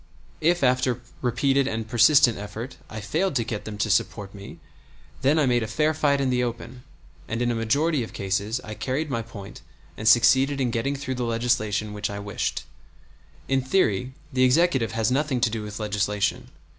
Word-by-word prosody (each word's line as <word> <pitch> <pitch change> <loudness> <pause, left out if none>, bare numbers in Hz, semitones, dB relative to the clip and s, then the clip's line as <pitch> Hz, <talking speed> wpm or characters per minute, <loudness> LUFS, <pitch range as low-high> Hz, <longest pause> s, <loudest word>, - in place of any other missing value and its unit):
If 175 +1 +2
after 125 -1 +2 0.2
repeated 135 +2 +1
and 110 -3 -3
persistent 120 0 +5
effort 110 +5 -7
I 110 0 -6
failed 155 - -1
to 120 - +2
get 110 -2 -5
them 105 -1 -6
to 105 +2 -1
support 100 0 0
me, 100 -1 -10 0.6
then 145 +4 +3
I 155 - +3
made 120 -2 +2
a 110 - -2
fair 150 +7 +1
fight 145 -2 +2
in 135 -2 +1
the 125 0 +1
open, 120 +1 -5 0.5
and 115 - -3
in 120 0 +1
a - - 0
majority 140 +7 +1
of 115 - -5
cases 100 +4 -2
I 110 - -7
carried 135 +7 -3
my 115 -3 -1
point 105 -3 -10 0.3
and 110 - -4
succeeded 130 +4 +5
in 125 -3 0
getting 125 +5 -1
through 135 -1 -4
the - - 0
legislation 115 -3 0
which 105 0 -3
I 100 - -5
wished. 100 0 -3 0.8
In 135 0 +2
theory 130 - +1 0.2
the 130 0 +3
Executive 130 -3 +3
has 115 +1 0
nothing 140 -1 0
to 120 -2 +2
do 115 -1 -3
with 105 0 -7
legislation. 105 -1 -1
120 Hz, 190 wpm, -25 LUFS, 110-135 Hz, 0.8 s, persistent